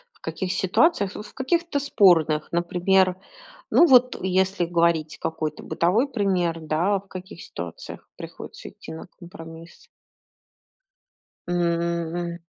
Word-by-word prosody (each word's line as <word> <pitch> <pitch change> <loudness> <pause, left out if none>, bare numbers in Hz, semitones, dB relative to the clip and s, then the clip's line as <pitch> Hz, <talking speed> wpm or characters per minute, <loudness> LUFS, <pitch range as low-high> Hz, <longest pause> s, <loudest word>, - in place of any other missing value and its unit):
В - - -28
каких 190 -2 -4
ситуациях? 200 - +2
Вот 210 - -7
в - - -17
каких-то 335 +2 0
спорных. 165 - +3
Например, 180 +2 +2 0.5
ну, 345 - +6
вот 255 -4 +5
если 190 0 +1
говорить 170 -2 +1
какой-то 155 -2 -3
бытовой 200 +11 +1
пример, 185 -9 0
да, 170 +6 0
в 195 - -21
каких 185 -1 -9
ситуациях 85 -1 -8
приходится - - -10
идти - - -12
на 160 - -9
компромисс? 165 -2 -12 1.6
М. 170 0 -1
175 Hz, 115 wpm, -24 LUFS, 170-200 Hz, 1.6 s, ну